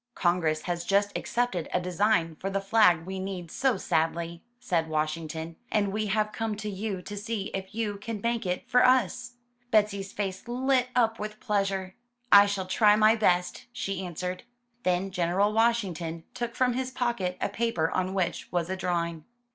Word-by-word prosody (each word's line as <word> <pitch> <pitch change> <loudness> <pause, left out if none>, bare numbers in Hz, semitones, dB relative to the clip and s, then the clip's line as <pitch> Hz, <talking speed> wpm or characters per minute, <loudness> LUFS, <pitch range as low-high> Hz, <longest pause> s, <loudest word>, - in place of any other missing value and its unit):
''Congress 170 -3 +1
has 175 -1 -2
just 200 +2 +1
accepted 235 -9 -1
a - - +2
design 180 -2 +1
for 195 - -4
the 195 0 0
flag 195 -5 +4
we 190 +1 -5
need 185 -3 -5
so 255 -5 +1
sadly,'* 165 0 -1 0.2
said 175 -10 0
Washington, 160 +1 -3
''and 205 -2 +2
we 215 +2 -1
have 215 +1 +1
come 225 -1 -2
to 210 0 -5
you 195 -1 -4
to 205 - -7
see 210 0 -4
if 195 +2 -5
you 215 -3 -2
can 210 +1 -5
make 235 +2 -1
it 180 -1 -3
for 250 +1 +4
us.'* 250 0 +2 0.4
Betsy's 205 -4 +2
face 195 +1 -4
lit 255 +1 +1
up 225 -2 +2
with 210 0 -5
pleasure. 195 -2 -1 0.4
"I 200 0 +9
shall 200 -2 -2
try 210 +3 +4
my 215 +1 +6
best," 180 -4 +1
she 195 -6 -3
answered. 180 +1 -4 0.4
Then 185 -1 0
General 185 +4 +1
Washington 190 -8 0
took 240 -1 -4
from 250 -1 +2
his 260 +1 -2
pocket 235 -8 -1
a - - 0
paper 205 -7 0
on 185 +1 -1
which 185 -3 -2
was 175 0 -1
a - - 0
drawing. 170 -3 -2
195 Hz, 175 wpm, -28 LUFS, 180-220 Hz, 0.4 s, I